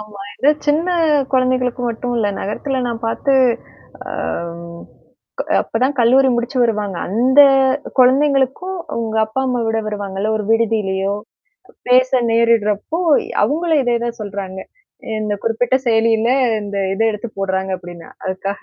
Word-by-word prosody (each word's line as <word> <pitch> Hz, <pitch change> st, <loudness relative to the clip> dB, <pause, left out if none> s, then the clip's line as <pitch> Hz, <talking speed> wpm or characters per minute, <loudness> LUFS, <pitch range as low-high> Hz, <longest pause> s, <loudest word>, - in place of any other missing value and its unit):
ஆமா. 210 Hz, -2 st, -10 dB, 0.2 s
இத 285 Hz, -, +4 dB, 0.2 s
சின்ன 310 Hz, +4 st, +1 dB, 0.4 s
குழந்தைகளுக்கு 255 Hz, -1 st, +1 dB
மட்டும் 245 Hz, +2 st, -4 dB
இல்ல. 215 Hz, -3 st, +1 dB
நகரத்தில 260 Hz, +6 st, -3 dB
நான் 230 Hz, 0 st, -5 dB
பார்த்து 275 Hz, +4 st, -1 dB, 0.8 s
அ. -, -, -6 dB, 1.3 s
க -, -, 0 dB, 0.2 s
அப்பதான் 255 Hz, +5 st, -1 dB
கல்லூரி 260 Hz, +3 st, +4 dB
முடிச்சு 240 Hz, +3 st, -3 dB
வருவாங்க. 210 Hz, -5 st, -1 dB
அந்த 255 Hz, +8 st, +4 dB, 0.6 s
குழந்தைங்களுக்கும் 275 Hz, +7 st, +2 dB, 0.2 s
உங்க 220 Hz, -1 st, -3 dB
அப்பா, 220 Hz, +5 st, -3 dB
அம்மா 250 Hz, -1 st, -1 dB
விட 225 Hz, 0 st, 0 dB
வருவாங்கல்ல? 205 Hz, 0 st, -3 dB
ஒரு 215 Hz, -, -3 dB
விடுதியிலயோ? 205 Hz, -4 st, +1 dB, 0.7 s
பேச 255 Hz, +1 st, +4 dB, 0.2 s
நேரிடுறப்போ 230 Hz, -, +1 dB, 0.4 s
அவங்களும் 320 Hz, +1 st, +1 dB
இதே 240 Hz, -2 st, +1 dB
தான் 235 Hz, 0 st, -4 dB
சொல்றாங்க. 195 Hz, -2 st, -6 dB, 0.6 s
இந்த 210 Hz, -1 st, -2 dB
குறிப்பிட்ட 230 Hz, +2 st, 0 dB
செயலியில 225 Hz, 0 st, +2 dB, 0.3 s
இந்த 200 Hz, 0 st, -6 dB, 0.2 s
இத 225 Hz, -, -1 dB
எடுத்து 215 Hz, +2 st, -5 dB
போடுறாங்க 190 Hz, 0 st, -2 dB
அப்ப்டின்னா, 175 Hz, -2 st, -11 dB, 0.2 s
அதுக்காக, 195 Hz, +1 st, -4 dB
230 Hz, 125 wpm, -18 LUFS, 205-255 Hz, 1.3 s, இத